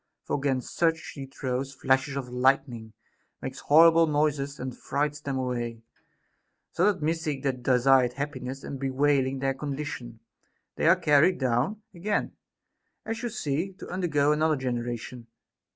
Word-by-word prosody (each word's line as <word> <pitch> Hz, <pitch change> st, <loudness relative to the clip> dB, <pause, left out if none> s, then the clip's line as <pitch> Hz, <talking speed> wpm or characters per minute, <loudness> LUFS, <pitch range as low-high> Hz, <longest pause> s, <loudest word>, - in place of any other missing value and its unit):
For -, -, -2 dB
against 135 Hz, -3 st, -2 dB
such 165 Hz, -1 st, +3 dB
she 140 Hz, -4 st, -8 dB
throws 135 Hz, 0 st, -4 dB
flashes 135 Hz, +2 st, +1 dB
of 135 Hz, -2 st, -3 dB
lightning, 125 Hz, -3 st, 0 dB, 0.5 s
makes 130 Hz, 0 st, -6 dB
horrible 165 Hz, +2 st, +6 dB
noises, 145 Hz, -2 st, 0 dB
and 125 Hz, -1 st, -5 dB
frights 150 Hz, +1 st, -2 dB
them 140 Hz, -2 st, -3 dB
away; 120 Hz, -3 st, -3 dB, 0.9 s
so 190 Hz, +4 st, +3 dB
that, 185 Hz, -6 st, -7 dB
missing 155 Hz, -3 st, -1 dB
their 140 Hz, -1 st, +1 dB
desired 125 Hz, 0 st, +3 dB
happiness 135 Hz, -1 st, -5 dB
and 135 Hz, -, -6 dB
bewailing 135 Hz, 0 st, +1 dB
their 135 Hz, 0 st, 0 dB
condition, 140 Hz, -4 st, -5 dB, 0.6 s
they -, -, +1 dB
are 170 Hz, -, +7 dB
carried 165 Hz, +1 st, +4 dB
down 135 Hz, -, 0 dB
again 200 Hz, +4 st, -1 dB, 0.7 s
(as 225 Hz, 0 st, -4 dB
you 240 Hz, -, -2 dB
see) 180 Hz, -, -2 dB
to 190 Hz, -, -11 dB
undergo 155 Hz, -6 st, +1 dB
another 155 Hz, +1 st, +2 dB
generation. 120 Hz, -2 st, -4 dB
140 Hz, 140 wpm, -27 LUFS, 130-155 Hz, 0.9 s, are